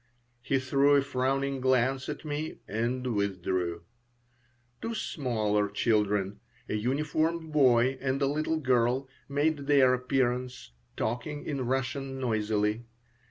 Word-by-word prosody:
He 135 - +1
threw 140 +2 +3
a 140 - +4
frowning 135 0 -1
glance 130 +1 +2
at 150 +1 -6
me, 150 +1 -3
and 120 +4 -2
withdrew. 95 -4 -1 1.0
Two 230 0 -3
smaller 110 - 0
children, 105 -2 +1 0.3
a - - -3
uniformed 155 +8 0
boy 130 -3 +4
and 135 0 0
a 140 - +2
little 155 +3 0
girl, 130 -1 +1 0.2
made 145 0 0
their 135 -3 +5
appearance, 125 - -1 0.3
talking 145 +6 -3
in 135 -5 -2
Russian 135 +1 -2
noisily. 110 -2 0
130 Hz, 115 wpm, -29 LUFS, 115-140 Hz, 1.0 s, their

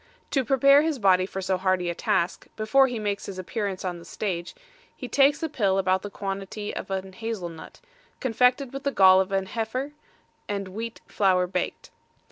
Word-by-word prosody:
To 270 - +2
prepare 275 +3 +5
his 315 -2 0
body 185 -4 +3
for 195 -1 -5
so 190 0 0
hardy 185 -1 +1
a 170 - 0
task, 170 +1 -1
before 225 +5 +4
he 245 -2 -4
makes 205 -2 -3
his 195 - -7
appearance 195 0 -3
on 175 -2 -3
the - - -12
stage, 175 -1 -4 0.4
he 250 - -7
takes 280 +4 +3
a - - +1
pill 205 -10 +1
about 190 -1 +2
the 205 - -6
quantity 195 +1 -5
of - - -6
a 190 0 -3
hazel 220 -3 -4
nut, 160 -1 -12 0.4
confected 250 +1 +2
with 275 - -5
the 280 - -1
gall 190 -4 +7
of 190 +1 -4
an 195 -1 0
heifer, 235 +7 -3 0.6
and 200 -2 -3
wheat 225 +4 -6
flour 185 -3 +2
baked. 180 - -4
200 Hz, 190 wpm, -26 LUFS, 185-250 Hz, 0.6 s, gall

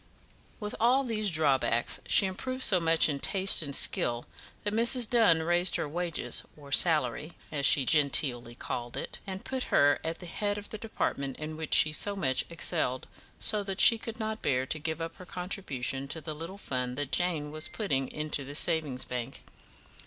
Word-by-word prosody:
With 210 -1 -5
all 250 +4 +3
these 215 -4 0
drawbacks 140 -7 +2
she - - +5
improved 255 +8 -3
so 185 - +4
much 165 -1 +3
in 145 -3 -3
taste 195 +5 +4
and 140 -3 -2
skill 120 0 +2 0.4
that 205 - -2
Mrs. 235 +1 +3
Dunn 205 -10 +3
raised 175 +2 +2
her - - 0
wages 170 +1 -1 0.2
or 140 -2 -14
salary, 150 -1 +3 0.2
as 145 -2 +2
she 140 -4 +4
genteelly 130 -5 +1
called 120 0 -6
it - - -6
and 190 0 -7
put 260 -1 -3
her 145 0 +3
at 165 +1 -4
the 180 - -11
head 205 +4 -3
of 205 - -9
the 215 - -7
department 140 - -3
in 155 0 -7
which 155 -1 -1
she 155 - +4
so 200 +5 +1
much 130 -9 0
excelled, 155 -5 -1 0.3
so 210 -2 +1
that 195 -1 -5
she 230 - +6
could 225 +1 -8
not 220 0 -4
bear 130 -1 0
to 155 - -4
give 160 +1 -4
up 165 0 -8
her 180 - -12
contribution 140 -8 -4
to 160 - -4
the 155 0 -6
little 165 +6 -8
fund 125 -8 -4
that 145 -1 -3
Jane 160 -4 -1
was 155 +1 -6
putting 135 - -2
into 150 -1 -3
the 140 +2 -7
Savings 155 -6 +2
Bank. 125 +1 -6
160 Hz, 190 wpm, -28 LUFS, 140-195 Hz, 0.4 s, she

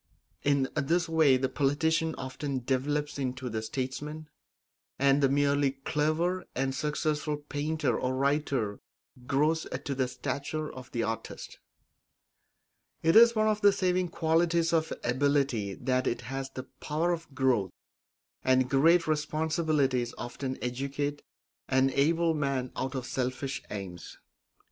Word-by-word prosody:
In 140 -2 +2
this 165 +4 +1
way 160 -5 +4
the 130 +1 0
politician 160 +4 +1
often 130 0 -4
develops 145 +3 -1
into 130 -1 -3
the 110 0 -2
statesman, 145 +6 -4 0.7
and 140 +1 +4
the 135 - +4
merely 140 0 +2
clever 155 +6 0
and 135 0 0
successful 150 0 -1
painter 150 +2 -1
or 130 0 -1
writer 135 -6 0 0.5
grows 155 +4 +1 0.2
to 140 - -1
the 130 -1 0
stature 140 +4 -4
of 130 -1 -10
the 115 - -1
artist. 115 0 -5 1.4
It 165 0 +4
is 235 +1 +8
one 215 0 +3
of 215 -1 +1
the 205 - +7
saving 185 -2 +1
qualities 165 0 +2
of 160 -1 +1
ability 130 -5 +1
that 130 0 0
it 120 - -1
has 135 +2 -5
the 130 -1 -7 0.2
power 160 +4 0
of 165 -5 -5
growth, 125 -8 +2 0.7
and 130 -1 +3
great 165 +5 +5
responsibilities 155 -4 0
often 130 +2 -4
educate 140 +3 -2 0.5
an 130 0 +3
able 165 +4 +2
man 140 -4 -1
out 130 +1 -3
of 130 -2 -3
selfish 130 +2 -2
aims. 95 -4 -7
140 Hz, 130 wpm, -29 LUFS, 130-155 Hz, 1.4 s, is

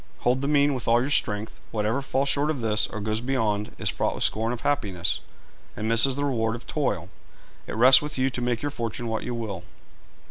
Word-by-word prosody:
Hold 125 +2 +2
the 140 - -1
mean 145 -1 +3
with 125 -3 -5
all 115 +1 +5
your 130 +4 -1
strength. 105 -5 0
Whatever 110 +5 -1
falls 135 0 0
short 145 +2 +1
of 145 -5 -2
this, 110 -1 +2
or 110 - -6
goes 110 +2 -1
beyond, 110 -5 -1
is - - -1
fraught - - -1
with - - -1
scorn 110 +2 +1
of 120 - -5
happiness, 95 -11 -1 0.6
and 110 - -2
misses 115 +4 +4
the 145 +1 -1
reward 115 -5 0
of 120 - -9
toil. 100 - -2 0.6
It - - -5
rests 130 +4 +8
with 150 -1 -5
you 130 +1 +1
to 125 - -3
make 120 0 -1
your 145 - -1
fortune 120 -2 -4
what 110 -1 -2
you 125 - -4
will. 105 -7 -5
120 Hz, 220 wpm, -25 LUFS, 110-135 Hz, 0.6 s, rests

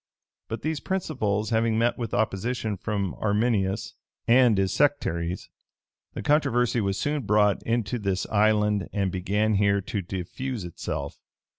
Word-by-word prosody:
But 110 -1 -5
these 155 0 -1
principles 120 - -1
having 115 0 +2
met 120 +1 +2
with 115 -3 -4
opposition 110 +1 -1
from 100 -2 -2
Arminius 105 -1 0 0.3
and 120 -3 +5
his 95 -1 +1
sectaries, 90 - 0 0.7
the - - -4
controversy 125 -6 +2
was 100 -1 -1
soon 145 0 0
brought 105 -2 +3
into 120 +1 0
this 95 -3 -1
island 105 -1 +2
and 100 -3 0
began 105 +4 0
here 100 0 +3
to 100 +2 -3
diffuse 95 +7 -5
itself. 85 -2 -5
105 Hz, 135 wpm, -26 LUFS, 100-120 Hz, 0.7 s, and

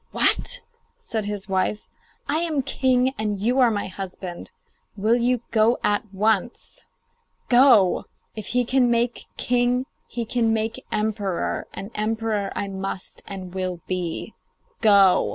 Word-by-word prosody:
'What!' - - +1 0.4
said 225 - -4
his 205 -2 -4
wife. 195 +2 -1 0.4
'I 290 +2 +1
am 320 -4 0
king, 260 -1 +2
and 210 -1 -1
you 240 +7 +1
are 250 -2 +6
my 205 -2 -1
husband. 185 -2 -7 0.5
Will 215 +3 +2
you 245 0 +1
go 225 +2 +4
at 205 0 0
once? 215 +3 -1 0.6
Go! 240 -7 +5 0.3
If 215 - -6
he 245 0 +1
can 250 0 +3
make 235 0 0
king 245 +1 +1 0.2
he 235 -1 -4
can 230 0 +1
make 225 +3 -2
emperor, 210 -4 -1
and 200 +3 -7
emperor 215 -2 -1
I 200 - -2
must 195 -1 -5
and 185 -2 -7
will 185 -2 -3
be. 180 -3 -3 0.5
Go! 200 -4 +6
220 Hz, 135 wpm, -24 LUFS, 195-245 Hz, 0.6 s, are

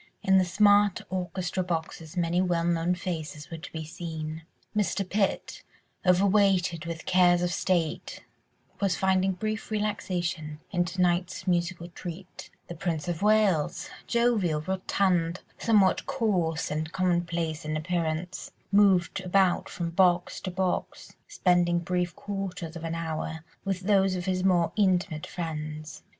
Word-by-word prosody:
In 190 0 +5
the 185 - +3
smart 205 +1 +4
orchestra 185 0 -2
boxes 165 -1 -4
many 175 +1 +2
well 175 -2 +1
known 170 +1 +1
faces 160 -4 -5
were 165 - -5
to - - -9
be 160 -1 -5
seen. 160 -1 -6 0.3
Mr. 200 -2 0
Pitt, 195 0 -1 0.4
overweighted 185 -3 +3
with 165 -1 -5
cares 180 -1 +4
of 175 0 0
state, 175 -4 -1 0.6
was 195 -4 +1
finding 190 +1 +2
brief 215 +4 -4
relaxation 180 -7 -2
in 175 -2 +1
to 180 +1 0
night's 175 +1 0
musical 175 -1 0
treat; 180 +1 -9 0.2
the - - -6
Prince 170 0 -3
of 175 -1 -2
Wales, 210 -7 +2 0.2
jovial, 220 -10 +2
rotund, 185 -1 0 0.2
somewhat 205 -4 +3
coarse 180 - 0
and 155 +1 -2
commonplace 170 -3 0
in 155 0 -2
appearance, 170 +1 -2 0.2
moved 195 -3 +4
about 185 0 +2
from 170 -2 -4
box 175 0 +2
to 185 - -3
box, 185 0 -3
spending 175 -1 +2
brief 180 0 -1
quarters 190 -4 -5
of 165 - -7
an 165 0 -3
hour 160 -1 -4 0.2
with 195 -2 -2
those 195 -1 +3
of 175 -1 -4
his 185 -1 0
more 175 -3 +3
intimate 180 -6 +1
friends. 155 -2 -5
180 Hz, 135 wpm, -28 LUFS, 165-190 Hz, 0.6 s, In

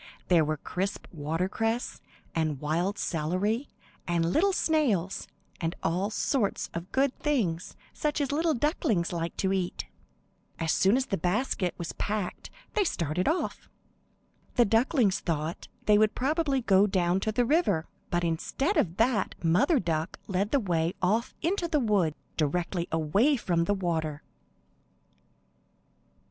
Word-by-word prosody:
There 170 -3 +5
were 155 0 -1
crisp 190 +6 -3
watercress, 185 +10 -2 0.3
and 155 -4 0
wild 170 +7 -1
celery, 185 - -1 0.4
and 170 -1 +1
little 390 +5 +4
snails, 255 - +1 0.3
and 165 0 -2
all 180 +5 0
sorts 220 0 0
of 170 +2 -6
good 270 0 +2
things 200 - -1 0.2
such 300 -1 -1
as 285 -2 0
little 320 +2 +2
ducklings 225 - 0
like 170 0 -3
to 190 0 +1
eat. 185 -2 -2 0.7
As 165 -2 0
soon 195 +6 +4
as 265 - 0
the 195 -8 -2
basket 180 +1 0
was 170 - -5
packed 205 -3 -3 0.2
they 425 - +3
started 175 - -1
off. 325 +5 -1 0.9
The 240 - +5
ducklings 225 - +3
thought 160 0 -3 0.2
they 210 -1 +5
would 215 0 +3
probably 280 0 +1
go 200 -2 +4
down 185 -2 +1
to 215 +2 -1
the 245 +3 +2
river, 230 - +2 0.2
but 175 0 0
instead 220 - 0
of 170 +1 +1
that 230 0 +1
Mother 245 - +4
Duck 165 -2 -2
led 195 +1 0
the 280 - +3
way 170 -5 0
off 220 +7 +1
into 350 +1 +1
the 310 -3 +1
wood, 200 - +2 0.2
directly 170 +3 0
away 195 - +3
from 170 -6 0
the 205 - +1
water. 160 -5 -2
195 Hz, 140 wpm, -28 LUFS, 170-250 Hz, 0.9 s, There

